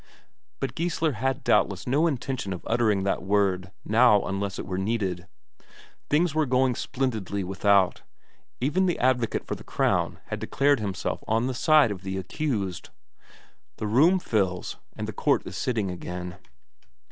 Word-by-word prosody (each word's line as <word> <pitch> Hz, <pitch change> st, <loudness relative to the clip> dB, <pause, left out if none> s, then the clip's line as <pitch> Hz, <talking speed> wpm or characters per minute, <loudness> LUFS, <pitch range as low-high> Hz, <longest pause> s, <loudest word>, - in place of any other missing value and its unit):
But 135 Hz, -, -3 dB
Geissler 165 Hz, -2 st, 0 dB
had 130 Hz, +4 st, -2 dB
doubtless 100 Hz, -3 st, +2 dB
no 145 Hz, +7 st, +2 dB
intention 130 Hz, -, -2 dB
of 90 Hz, -, -8 dB
uttering 110 Hz, -4 st, +2 dB
that 100 Hz, -, 0 dB
word 95 Hz, -2 st, +1 dB
now 110 Hz, -2 st, +5 dB
unless 100 Hz, 0 st, -3 dB
it -, -, -5 dB
were 95 Hz, -1 st, -3 dB
needed. 95 Hz, -4 st, -2 dB, 0.8 s
Things 160 Hz, +2 st, +2 dB
were 155 Hz, -1 st, +1 dB
going 130 Hz, 0 st, +3 dB
splendidly 110 Hz, -7 st, -2 dB
without; 95 Hz, 0 st, +2 dB, 0.6 s
even 150 Hz, +9 st, +1 dB
the 175 Hz, -, 0 dB
advocate 125 Hz, -2 st, +1 dB
for -, -, -3 dB
the -, -, -8 dB
Crown -, -, 0 dB
had -, -, -3 dB
declared 140 Hz, -1 st, +2 dB
himself 100 Hz, -3 st, -3 dB
on 110 Hz, +2 st, +1 dB
the 130 Hz, -, -1 dB
side 150 Hz, -2 st, +4 dB
of 95 Hz, -3 st, -6 dB
the 95 Hz, 0 st, -4 dB
accused. 100 Hz, -, -3 dB, 0.9 s
The -, -, -4 dB
room 145 Hz, -, +4 dB
fills, 95 Hz, -, -1 dB, 0.2 s
and -, -, -4 dB
the -, -, -5 dB
court -, -, +1 dB
is -, -, -7 dB
sitting 110 Hz, -7 st, -1 dB
again. 90 Hz, 0 st, -6 dB
110 Hz, 155 wpm, -26 LUFS, 95-135 Hz, 0.9 s, now